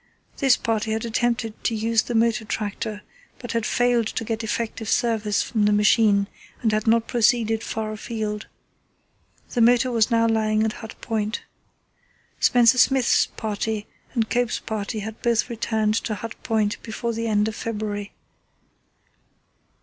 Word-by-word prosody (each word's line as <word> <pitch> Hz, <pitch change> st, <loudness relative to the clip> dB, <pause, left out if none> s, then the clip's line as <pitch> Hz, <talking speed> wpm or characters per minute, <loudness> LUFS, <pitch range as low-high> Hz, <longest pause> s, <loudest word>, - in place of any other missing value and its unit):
This 270 Hz, -3 st, +4 dB
party 220 Hz, -1 st, -1 dB
had 220 Hz, +1 st, -2 dB
attempted 230 Hz, -1 st, -1 dB
to 230 Hz, -, 0 dB
use 225 Hz, +1 st, +2 dB
the 240 Hz, -, -4 dB
motor 230 Hz, 0 st, +2 dB
tractor, 210 Hz, 0 st, -4 dB, 0.3 s
but 240 Hz, -, -7 dB
had 230 Hz, -2 st, -1 dB
failed 245 Hz, -2 st, +2 dB
to -, -, -3 dB
get 225 Hz, 0 st, -3 dB
effective 225 Hz, 0 st, -3 dB
service 220 Hz, -4 st, +1 dB
from 215 Hz, -3 st, 0 dB
the 210 Hz, -, +4 dB
machine 210 Hz, -1 st, +4 dB, 0.4 s
and 220 Hz, -, +3 dB
had 215 Hz, +1 st, -1 dB
not 230 Hz, 0 st, +3 dB
proceeded 225 Hz, -2 st, +2 dB
far 220 Hz, -1 st, -3 dB
afield. 215 Hz, -1 st, -4 dB, 1.1 s
The 240 Hz, -, +1 dB
motor 245 Hz, +2 st, +4 dB
was 225 Hz, -1 st, +2 dB
now 230 Hz, -1 st, +3 dB
lying 215 Hz, -1 st, +2 dB
at 220 Hz, -1 st, 0 dB
Hut 220 Hz, -1 st, -9 dB
Point. 215 Hz, 0 st, -2 dB, 1.0 s
Spencer 245 Hz, +1 st, +5 dB
Smith's 255 Hz, +1 st, +4 dB
party 215 Hz, -1 st, -3 dB, 0.3 s
and 225 Hz, -2 st, +1 dB
Cope's 245 Hz, 0 st, 0 dB
party 215 Hz, 0 st, -4 dB
had 220 Hz, +2 st, -7 dB
both 235 Hz, +1 st, +1 dB
returned 220 Hz, -2 st, 0 dB
to 215 Hz, -, -2 dB
Hut 230 Hz, +2 st, -6 dB
Point 215 Hz, -2 st, 0 dB
before 235 Hz, +1 st, -4 dB
the 230 Hz, +1 st, -2 dB
end 210 Hz, -1 st, +2 dB
of 220 Hz, -, -4 dB
February. 210 Hz, -3 st, -4 dB
225 Hz, 150 wpm, -23 LUFS, 215-235 Hz, 1.1 s, Spencer